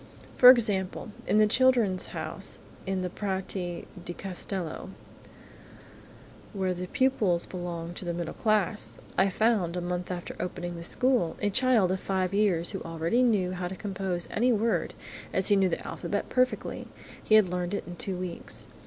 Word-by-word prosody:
For 250 Hz, -, +10 dB
example, 210 Hz, -5 st, +3 dB, 0.2 s
in -, -, +3 dB
the 215 Hz, -, +6 dB
"Children's 225 Hz, -5 st, +3 dB
House" -, -, -5 dB, 0.3 s
in 190 Hz, -1 st, -1 dB
the 180 Hz, -, -2 dB
Prati 190 Hz, -3 st, -3 dB, 0.2 s
di 175 Hz, -, -5 dB
Castello, 185 Hz, -2 st, -4 dB, 1.6 s
where 190 Hz, -2 st, 0 dB
the 180 Hz, +1 st, -5 dB
pupils 205 Hz, -9 st, +1 dB
belong 175 Hz, -2 st, -5 dB
to 180 Hz, -, -7 dB
the 175 Hz, -, -1 dB
middle 170 Hz, -1 st, -4 dB
class, 195 Hz, -, 0 dB, 0.2 s
I 190 Hz, +1 st, +4 dB
found, 195 Hz, -4 st, +1 dB
a -, -, 0 dB
month 180 Hz, 0 st, -3 dB
after 180 Hz, -1 st, -5 dB
the -, -, -8 dB
opening 175 Hz, -1 st, -4 dB
of 170 Hz, -, -7 dB
the 170 Hz, -, -7 dB
school, 250 Hz, -9 st, +1 dB
a 205 Hz, -1 st, 0 dB
child 235 Hz, -5 st, +3 dB
of 190 Hz, -, -1 dB
five 190 Hz, -1 st, -1 dB
years 190 Hz, -5 st, +2 dB
who -, -, -5 dB
already 165 Hz, +8 st, 0 dB
knew 205 Hz, -7 st, +2 dB
how 180 Hz, -1 st, -3 dB
to 190 Hz, -, -6 dB
compose 190 Hz, -3 st, -3 dB
any 245 Hz, +4 st, +2 dB
word, 225 Hz, 0 st, 0 dB, 0.4 s
as 190 Hz, -, +3 dB
he 205 Hz, -, +6 dB
knew 190 Hz, -1 st, +3 dB
the -, -, -4 dB
alphabet -, -, -3 dB
perfectly–he 255 Hz, -3 st, -1 dB
had 215 Hz, -4 st, +6 dB
learned 180 Hz, +2 st, -2 dB
it -, -, -3 dB
in 175 Hz, -, -8 dB
two 190 Hz, +2 st, -2 dB
weeks. 180 Hz, -1 st, -4 dB
190 Hz, 170 wpm, -28 LUFS, 175-215 Hz, 1.6 s, For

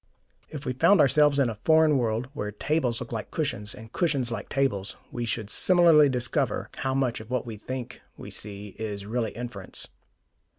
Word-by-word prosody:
If 150 Hz, -2 st, -7 dB
we 130 Hz, -, -1 dB
found 180 Hz, +9 st, +4 dB
ourselves 145 Hz, +1 st, +5 dB
in 140 Hz, -3 st, +3 dB
a 110 Hz, -2 st, -5 dB
foreign 160 Hz, -1 st, +5 dB
world, 115 Hz, +1 st, -1 dB
where 105 Hz, -7 st, -4 dB
tables 125 Hz, +1 st, -1 dB
looked -, -, -7 dB
like -, -, -4 dB
cushions 105 Hz, +4 st, -2 dB
and 110 Hz, -2 st, -12 dB
cushions 140 Hz, -8 st, +1 dB
like 110 Hz, -3 st, -5 dB
tables, 120 Hz, -8 st, 0 dB, 0.2 s
we 120 Hz, -1 st, -3 dB
should 110 Hz, -2 st, -3 dB
similarly 170 Hz, -5 st, +6 dB
discover 120 Hz, -2 st, -1 dB
how 130 Hz, 0 st, -1 dB
much 130 Hz, -3 st, 0 dB
of 110 Hz, +1 st, -11 dB
what 125 Hz, -1 st, -1 dB
we 115 Hz, -2 st, -6 dB
think 130 Hz, +3 st, -6 dB, 0.2 s
we -, -, -9 dB
see 105 Hz, 0 st, -7 dB
is 105 Hz, -3 st, -4 dB
really 115 Hz, +1 st, -1 dB
inference. 120 Hz, -6 st, -4 dB
125 Hz, 180 wpm, -26 LUFS, 110-140 Hz, 0.2 s, similarly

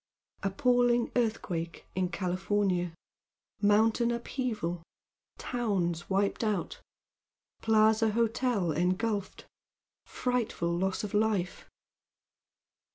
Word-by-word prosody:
Appalling 240 Hz, +4 st, +2 dB
Earthquake 180 Hz, -8 st, -2 dB
In 185 Hz, -1 st, 0 dB
California! 185 Hz, -1 st, 0 dB, 0.7 s
Mountain 220 Hz, +3 st, +4 dB
Upheaval! 235 Hz, -7 st, -2 dB, 0.6 s
Towns 190 Hz, -9 st, -1 dB
Wiped 200 Hz, +3 st, +1 dB
Out! 215 Hz, -, -2 dB, 0.8 s
Plaza 220 Hz, 0 st, +4 dB
Hotel 225 Hz, -4 st, +1 dB
Engulfed! 185 Hz, +6 st, -1 dB, 0.6 s
Frightful 230 Hz, -9 st, -1 dB
Loss 190 Hz, +3 st, -1 dB
of 210 Hz, -, -5 dB
Life! 210 Hz, -4 st, 0 dB
205 Hz, 75 wpm, -30 LUFS, 185-230 Hz, 0.8 s, Mountain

